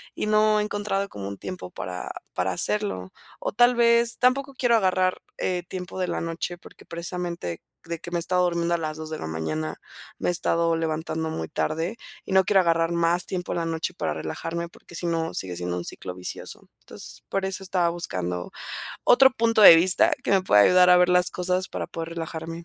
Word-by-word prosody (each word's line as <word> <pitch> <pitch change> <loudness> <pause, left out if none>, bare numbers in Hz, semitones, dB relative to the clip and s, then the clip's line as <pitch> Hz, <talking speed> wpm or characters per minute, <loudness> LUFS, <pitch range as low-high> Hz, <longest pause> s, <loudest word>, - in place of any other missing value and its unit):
y - - -2
no 215 0 +3
he - - +1
encontrado 205 -1 -2
como 100 - -7
un 100 0 -6
tiempo 185 - -7
para 90 0 -6 0.2
para 90 +1 0
hacerlo, 95 - -1 0.3
o - - -3
tal 245 +3 +5
vez, 235 0 +4
tampoco 270 +2 +2
quiero 245 -2 +3
agarrar, 185 -3 +1 0.2
eh, 180 -1 -1
tiempo 185 0 -6
de 185 - 0
la - - -2
noche, 165 +1 -4
porque - - -16
precisamente 170 - -5 0.2
de 170 0 -5
que 175 - -8
me 175 - 0
he - - 0
estado 180 +1 +1
durmiendo 170 -1 0
a - - +2
las 155 -1 -4
2 155 0 -7
de 155 - -4
la - - -5
mañana, 80 -1 -3 0.4
me - - 0
he - - +3
estado 165 -1 +1
levantando 160 0 -2
muy 80 - -4
tarde 165 - -2 0.3
y - - -8
no 190 0 +6
quiero 200 0 +3
agarrar 165 -1 +2
más 170 +1 +1
tiempo 180 -1 -3
en - - -1
la 165 - -2
noche 165 +2 -2
para - - -2
relajarme, 170 +1 -4
porque 170 0 -15
si 175 - -4
no 165 -1 -1
sigue 90 -2 -3
siendo 90 0 -3
un 85 - -5
ciclo 90 -1 -5
vicioso, 90 0 -7
entonces, - - -8
por 195 0 -1
eso 190 0 -2
estaba 180 -2 +1
buscando 90 - -4 0.5
otro 265 +2 +6
punto 230 -2 +2
de 170 - +12
vista, 190 - +4
que - - -2
me 195 -1 +4
pueda 105 - +5
ayudar 180 - +6
a 180 - +8
ver 180 0 +4
las 180 0 +3
cosas 180 +1 -1
para - - -5
poder 165 0 -6
relajarme. 165 0 -6
170 Hz, 210 wpm, -25 LUFS, 160-190 Hz, 0.5 s, de